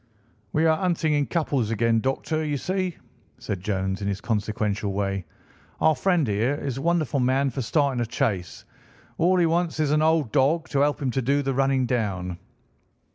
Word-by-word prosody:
"We're 160 +1 +3
hunting 165 -3 0
in 145 -1 +1
couples 140 -9 0
again, 115 0 +2
Doctor, 135 +6 -1
you 150 -2 -1
see," 185 +3 -2 0.4
said 95 -4 -5
Jones 95 -1 -2
in 100 - -2
his 100 -1 -2
consequential 105 -2 -1
way. 100 -2 -2 0.5
"Our 155 - +4
friend 175 -6 +1
here 110 +7 +1
is 140 -3 -4
a - - -5
wonderful 160 -4 +1
man 130 +2 +2
for 130 - -3
starting 135 0 +1
a - - 0
chase. 110 - -2 0.5
All 180 +3 +4
he 175 - +4
wants 165 0 0
is 150 -2 +1
an 150 0 +3
old 155 -6 +2
dog 155 +6 +2
to 140 - 0
help 145 +1 +2
him 130 - 0
to 135 - -1
do 140 +3 +1
the 135 0 -1
running 135 0 +2
down." 95 -7 -2
135 Hz, 185 wpm, -25 LUFS, 110-155 Hz, 0.5 s, Our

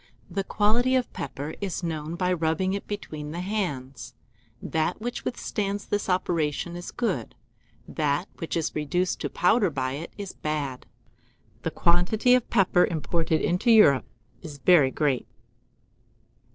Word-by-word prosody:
The 195 - -1
quality 230 +6 +2
of 255 -2 0
pepper 145 +3 -5
is 195 -2 -3
known 160 -1 -3
by 180 +1 +1
rubbing 170 +3 0
it 200 - -4
between 155 -8 -5
the 170 +3 -4
hands: 160 - -4 0.4
that 160 +4 -1
which 240 +2 -4
withstands 205 -4 -2
this 205 -1 -2
operation 170 -2 0
is 175 0 -6
good, 185 - -2 0.5
that 150 +3 0
which 165 0 -2
is 165 - -1
reduced 175 +5 -1
to - - -2
powder 200 +2 +3
by 130 -4 -2
it 145 +5 -6
is 200 -2 -6
bad. 145 -4 -3 0.7
The - - -1
quantity 180 +8 +3
of 250 -2 +2
pepper 185 -4 +4
imported 160 0 0
into 180 +7 +1
Europe 210 - +6 0.4
is 155 -5 -8
very 150 -2 +5
great. 140 -2 0
175 Hz, 140 wpm, -26 LUFS, 150-200 Hz, 0.7 s, Europe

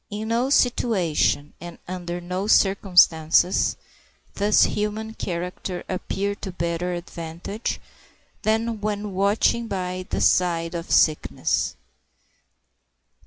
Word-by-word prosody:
In 215 +1 -5
no 240 +3 +1
situation 190 - +1
and 175 -1 -8
under 175 -1 -5
no 180 +3 -4
circumstances 180 -4 +4 0.6
does 205 +1 +4
human 215 +1 -2
character 180 -1 -4
appear 195 +2 -2
to 200 -1 -7
better 170 0 -2
advantage 170 +4 -5 0.6
than 220 0 0
when 210 -1 -3
watching 205 +4 +2
by 185 -2 -4
the - - -1
side 170 -2 +2
of 170 -1 -5
sickness. 155 -1 +2
185 Hz, 100 wpm, -24 LUFS, 175-210 Hz, 0.6 s, circumstances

